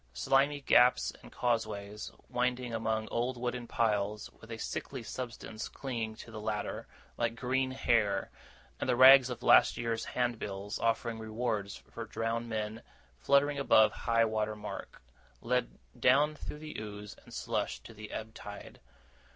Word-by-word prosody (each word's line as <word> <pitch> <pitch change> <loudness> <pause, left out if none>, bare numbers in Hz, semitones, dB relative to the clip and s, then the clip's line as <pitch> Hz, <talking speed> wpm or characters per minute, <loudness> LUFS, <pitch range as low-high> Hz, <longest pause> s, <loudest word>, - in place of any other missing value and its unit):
Slimy 135 - +2
gaps 125 -2 +4
and - - -13
causeways, 105 -3 -2 0.2
winding 125 -1 -1
among 110 -1 -1
old 120 +2 -1
wooden 120 0 -3
piles, 105 -2 0
with 115 - -17
a 115 - -5
sickly 130 +2 -5
substance 115 -2 -6
clinging 115 -5 -4
to 115 - -11
the 110 -1 -7
latter, 105 -1 -3 0.3
like 115 -1 0
green 130 +3 0
hair, 115 -6 +1 0.5
and - - -2
the 125 - +4
rags 130 0 +9
of 120 -1 -6
last - - +6
year's 115 -1 -1
handbills 105 -5 -2
offering 115 0 0
rewards 110 -2 -2
for - - -9
drowned 115 +1 -2
men 110 0 -3 0.4
fluttering 140 +1 +3
above 110 -6 +5
high 115 0 +2
water 110 -1 -1
mark, 105 -10 -8 0.4
led - - -1 0.2
down 145 +4 +4
through 150 - -7
the 155 0 -8
ooze 105 -1 -7
and - - -16
slush - - -2
to 115 - -12
the 110 0 -9
ebb 110 0 -6
tide. 105 -1 -10
115 Hz, 150 wpm, -32 LUFS, 110-125 Hz, 0.5 s, rags